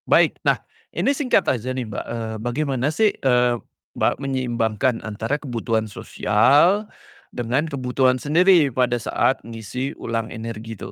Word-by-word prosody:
Baik. - - +4
Nah - - +2 0.4
ini - - +2
singkat 270 -2 +2
aja 125 0 0
nih, 130 -1 -3
Mbak, 105 - -5
eee, 115 -1 -4
bagaimana 130 +2 -1
sih, 205 +7 +2
eee, 125 -2 +3 0.4
Mbak, - - +2
menyeimbangkan 125 -2 -1
antara 110 +5 -2
kebutuhan 115 -5 -2
sosial 145 - +2 0.5
dengan 125 +6 0
kebutuhan 130 -2 +1
sendiri 160 +1 +4
pada 125 0 +1
saat - - +1
ngeisi 115 +4 -5
ulang 115 -1 -3
energi 115 0 -6
itu? - - -7
125 Hz, 135 wpm, -22 LUFS, 115-140 Hz, 0.5 s, Baik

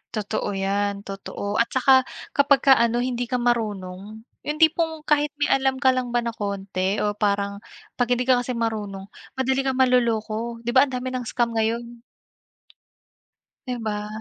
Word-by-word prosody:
Totoo 205 -1 -2
'yan, 200 +1 -1
totoo 200 +1 -4
at 235 - +3
saka 260 0 +4 0.2
kapag 280 -1 +3
ka 275 - +8
ano, 235 +1 +2
hindi 245 -1 -2
ka 250 - -2
marunong, 215 -4 -2 0.2
yung 300 +1 -2
tipong 320 -1 +1
kahit 295 -1 +2
may 290 -1 0
alam 265 -1 +2
ka 260 0 +3
lang 250 -2 -2
ba 240 - +2
na 235 - -2
konti 200 -2 -2
o 210 - +1
parang 200 -1 -1 0.4
pag 245 - +2
hindi 245 +1 +1
ka 250 -1 +3
kasi 245 0 -3
marunong 210 -4 -3 0.2
madali 265 0 0
kang 265 - 0
maloloko, 235 -2 +1
'di 240 - -1
ba 260 +3 +5
ang 265 - -9
dami 255 +1 -3
ng 250 -2 -4
scam 235 0 0
ngayon? 230 +1 -2 1.7
Di 250 - -2
ba? 210 -1 -2
235 Hz, 170 wpm, -23 LUFS, 210-255 Hz, 1.7 s, ka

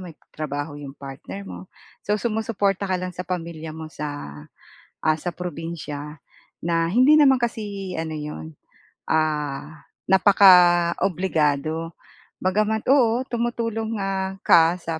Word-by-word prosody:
may 180 -3 -9 0.2
trabaho 145 0 -4
'yong 145 -2 -8
partner 140 +8 -8
mo, - - -8 0.4
so 210 - +1
sumusuporta 215 -4 -1
ka 190 -1 0
lang 185 0 -4
sa 180 +1 -6
pamilya 165 -3 -5
mo 160 0 -8
sa, 150 -1 -5 0.9
ah, 155 0 +2
sa 175 +2 -4
probinsiya. 155 -4 -6 0.4
Na 165 0 +1
hindi 255 - +5
naman 270 -4 +5
kasi 205 -5 -3
ano 160 -1 -3
'yon, 80 - -7 0.6
ah, 150 -1 -1 0.2
napaka-obligado 175 -4 +4 0.5
bagama't 215 +3 0
oo 245 -3 +4
tumutulong 230 -2 -2
nga 195 0 -2
ka 165 +1 +5
sa 165 -2 -5
175 Hz, 120 wpm, -23 LUFS, 155-205 Hz, 0.9 s, hindi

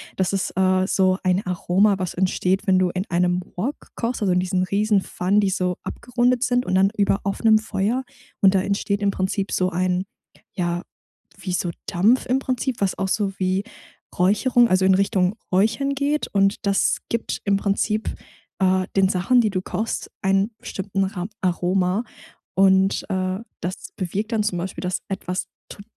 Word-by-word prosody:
Das 190 0 0
ist, 195 -1 -2
äh, 185 0 +2
so 185 -2 +2
ein 185 +2 +1
Aroma, 185 +3 +2
was 185 -2 -3
entsteht, 185 +1 0
wenn 185 -1 +4
du 185 -1 +2
in 185 +3 -3
einem 180 +1 +1 0.2
Wok 260 +11 -1 0.2
kochst, 235 -1 -2
also 190 -3 +2
in 180 - +3
diesen 185 0 0
Riesenpfannen, 200 0 +1
die 200 - +1
so 180 -1 -1
abgerundet 245 0 0
sind 250 0 +1
und 185 - 0
dann 195 +1 +4
über 200 -1 +2
offenem 215 +2 +3
Feuer, 220 +4 -1 0.4
und 195 0 +5
da 185 - +4
entsteht 200 +1 -1
im 200 -1 +2
Prinzip 195 +1 -2
so 185 0 +1
ein, 185 +1 0 0.5
ja, 175 -1 -2 0.5
wie 185 - -5
so 175 0 -1 0.2
Dampf 215 +9 +2
im 260 +2 +2
Prinzip, 255 -1 -2
was 195 -2 0
auch 195 0 -1
so 200 -2 0
wie 185 +2 0 0.5
Räucherung 235 +6 +3
also 185 0 +3
in 190 - +5
Richtung 195 0 +1 0.2
Räuchern 225 +9 +2
geht, 290 +2 0
und 195 0 +3
das 200 0 +2
gibt 230 -1 -2
im 200 -1 +3
Prinzip, 210 +2 -1 0.5
äh, 185 0 +2
den 190 -1 +4
Sachen, 200 +7 +3
die 215 - +1
du 185 -2 -2
kochst, 220 +4 -3
ein 195 +3 +2
bestimmten 195 0 -3
ram 190 -1 -4
Aroma. 180 +3 +1 0.5
Und, 190 0 +4
äh, 185 0 -1 0.2
das 180 +2 -5
bewirkt 200 +4 -3
dann 215 -2 +1
zum 190 -4 -1
Beispiel, 185 +2 -5
dass 180 0 -2
etwas 185 -1 -3 0.2
tot 200 - -10
195 Hz, 175 wpm, -22 LUFS, 185-210 Hz, 0.5 s, und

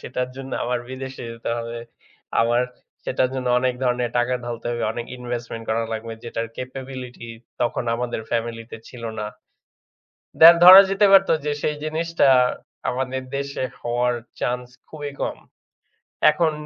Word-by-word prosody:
সেটার 125 0 -3
জন্য 135 0 -8
আমার 125 0 -1
বিদেশে 130 0 -7
যেতে 115 0 -5
হবে। 115 0 -5 0.6
আমার 120 +1 +3 0.4
সেটার 130 0 +1
জন্য 130 -1 -3
অনেক 125 0 +1
ধরনের 125 -1 0
টাকা 125 +1 +1
ঢালতে 120 -1 -6
হবে, 120 0 -3
অনেক 120 +1 -5
investment 120 -2 -5
করা 115 +1 +1
লাগবে 115 +1 -5
যেটার 115 -1 -3
capability 130 -2 -7 0.3
তখন 120 0 0
আমাদের 120 -1 -3
family 115 0 -2
তে - - -7
ছিল 125 -2 -11 0.2
না। 105 - -3 1.1
দে 160 - +12 0.2
ধরা 185 +2 +12
যেতে 195 +1 +4
পারতো 195 -3 +6
যে 150 - 0
সেই 150 - 0
জিনিসটা 165 -1 +1 0.6
আমাদের 130 +1 -3
দেশে 140 -1 -3 0.2
হওয়ার 120 +1 0 0.3
chance 125 0 -2 0.2
খুবই 145 -2 -7
কম। - - -2 0.9
এখন 155 +1 +1
125 Hz, 145 wpm, -22 LUFS, 120-135 Hz, 1.1 s, দে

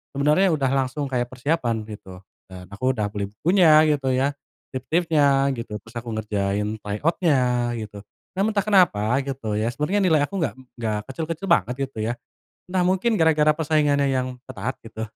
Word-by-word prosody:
sebenarnya 150 +7 +3
udah 135 -3 0
langsung 135 +2 -1
kayak 120 -1 0
persiapan 125 -3 -1
gitu 95 -4 -10 0.3
dan 90 -1 -10
aku 130 +6 -1
udah 105 - 0
beli 100 -1 -4
bukunya 155 - +5
gitu 140 -3 0
ya, 135 +2 +1 0.4
tips-tipsnya 140 -1 +2
gitu, 115 -3 -6
terus 115 +1 -17
aku 120 0 -8
ngerjain 105 0 -2
try 105 0 -4
out-nya 125 -8 +1
gitu. 105 -2 -7 0.4
Namun 210 +3 +1
entah 200 - +2
kenapa 135 - +3
gitu 130 -6 -3
ya, 110 +2 0
sebenernya 150 +9 0
nilai 160 -4 +4
aku 195 +6 -3
enggak 160 -6 -1 0.3
enggak 110 -2 -1
kecil-kecil 165 +5 -4
banget 125 - +2
gitu 135 - -18
ya. 120 - 0 0.6
Entah 185 -1 +1
mungkin 190 +4 +1
gara-gara 155 -2 +4
persaingannya 150 -2 +2
yang 130 -1 -2
ketat 130 +1 -4
gitu. 110 -1 -8
135 Hz, 165 wpm, -23 LUFS, 110-155 Hz, 0.6 s, bukunya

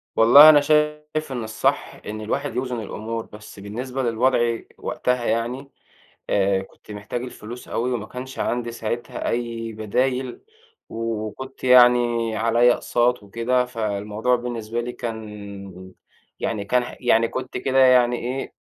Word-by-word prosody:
والله 140 +7 +9
أنا 150 -1 +7
شايف 150 0 0
إن 120 -3 -3
الصح 110 0 -1
إن 110 +1 -5
الواحد 140 +7 -3
يوزن 125 -2 -2
الأمور، 110 +2 -5
بس 105 -1 -13
بالنسبة 125 +6 -5
للوضع 120 0 +2 0.2
وقتها 125 -1 -1
يعني، 120 +5 -2 0.6
آآ 95 -1 +2
كنت 95 +2 -15
محتاج 105 +4 -5
الفلوس 120 -1 -9
أوي 125 +2 -2
وما 110 -3 -3
كانش 130 +3 -8
عندي 120 -1 -1
ساعتها 120 +1 -4
أي 115 -1 -3
بدايل 125 +4 -1 0.5
و 115 -1 -3
وكنت 130 +5 -10
يعني 120 -2 +5
عليّا 115 +2 +4
أقساط 120 -2 0
وكده، 120 +5 0
فالموضوع 110 0 -1
بالنسبة 120 -1 -4
لي 125 +1 -5
كان 100 -5 -8 0.5
يعني 105 -3 -2
كان 125 +3 +2
ح 120 - -8
يعني 115 -2 +3
كنت 130 +1 -5
كده 130 +1 -1
يعني 125 -2 +5
إيه، 130 +2 -4
120 Hz, 140 wpm, -23 LUFS, 110-125 Hz, 0.6 s, والله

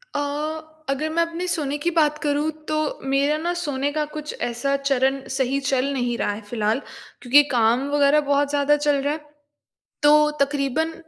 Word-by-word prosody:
अ, - - +1 0.7
अगर 300 +3 -1
मैं 335 +1 +2
अपने 335 +2 -5
सोने 295 -5 -1
की 345 - +1
बात 300 -1 +3
करूँ 295 +1 +1 0.2
तो 310 - 0 0.3
मेरा 280 +3 +2
ना 345 +2 -2
सोने 290 -5 -2
का 305 0 -1
कुछ 300 -1 -6
ऐसा 240 +4 -1
चरण 270 -1 +1 0.2
सही 265 +1 0
चल 270 -1 0
नहीं 245 -2 -1
रहा - - 0
है 210 +2 -6
फ़िलहाल। 220 +1 0 0.4
क्योंकि 280 +4 +6
काम 240 +3 +2
वग़ैरह 290 +1 +4
बहुत 285 0 +1
ज़्यादा 290 0 +3
चल 295 -1 +1
रहा 290 +2 0
है। 300 -1 -9 0.7
तो 300 0 +6
तकरीबन 285 +3 0
285 Hz, 175 wpm, -23 LUFS, 270-300 Hz, 0.7 s, क्योंकि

